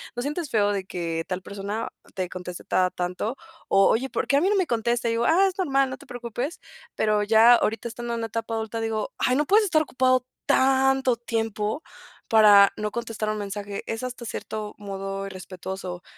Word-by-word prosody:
¿no 245 - -2
sientes 295 +2 -3
feo, 205 -2 +3
de 195 -2 -2
que 165 -3 -3
tal 185 0 -3
persona, 200 +3 -4 0.2
te 185 -3 -3
conteste 180 -1 -7
cada 185 -1 +1
tanto?" 180 +7 -3 0.3
O 195 0 +5
oye, 260 +4 +1
¿por - - -2
qué 280 - +3
a - - +3
mí 375 - +3
no 415 - +2
me 375 -3 +2
contesta? 235 +1 0
Y 230 - +1
digo: 230 +1 0
"Ah, 370 +7 +5
es 380 - -4
normal, 275 -7 +2
no 260 - -6
te - - -15
preocupes," 245 - -5 0.4
pero 215 -1 +2
ya 225 +3 +7
ahorita 225 0 -1
estando 235 +1 -5
en 230 -1 -3
etapa 225 0 -3
adulta 225 0 -3
digo: 220 -1 -2
"Ay 250 - +2
no 295 +3 +2
puedes 420 +6 +4
estar 315 -4 +3
ocupado, 290 - -7 0.5
tanto 265 -1 +3
tiempo 225 +2 -2 0.5
para 205 -3 +7
no 210 0 -3
contestar 225 -2 -3
un 215 - -1
mensaje." 200 0 -5
Es 225 +2 -4
hasta 250 -1 -5
cierto 215 -1 -5
modo 195 -1 -5
irrespetuoso 185 -1 -7
225 Hz, 195 wpm, -25 LUFS, 200-255 Hz, 0.5 s, ya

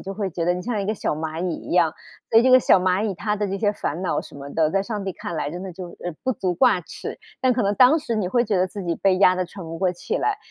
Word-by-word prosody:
就 195 - -6
会 195 -2 -2
觉 165 0 -3
得 175 - +3
你 180 - -5
像 220 -1 -2
一 195 - -3
个 215 - 0
小 195 - -2
蚂 160 +2 -4
蚁 175 - -1
一 - - -8
样， 170 -3 +4 0.4
所 225 - +7
以 - - +2
这 260 - +4
个 255 - +9
小 235 - +5
蚂 185 +3 +1
蚁 210 - 0
它 210 +4 -2
的 205 - -1
这 195 0 -3
些 205 0 +2
烦 175 -5 -4
恼 185 -3 -1
什 - - -14
么 140 0 -8
的， 160 -1 +2
在 195 +2 +1
上 205 -1 -4
帝 190 - -3
看 170 - -6
来 145 - -2
真 175 +3 -6
的 190 - -6
就 180 +1 -8
呃， 175 - -4
不 260 - +2
足 190 -5 -1
挂 210 -1 +4
齿， - - -8 0.2
但 255 0 +3
可 240 -1 0
能 200 - +1
当 260 +4 +7
时 235 -6 -3
你 210 -4 0
会 240 +5 +2
觉 205 -4 0
得 185 - +2
自 195 +2 -7
己 170 -2 -1
被 195 -1 +2
压 185 -2 +6
得 185 - 0
喘 190 0 -10
不 165 0 -7
过 185 0 +1
气 310 - -3
来。 425 -4 0
190 Hz, 350 characters per minute, -23 LUFS, 175-215 Hz, 0.4 s, 个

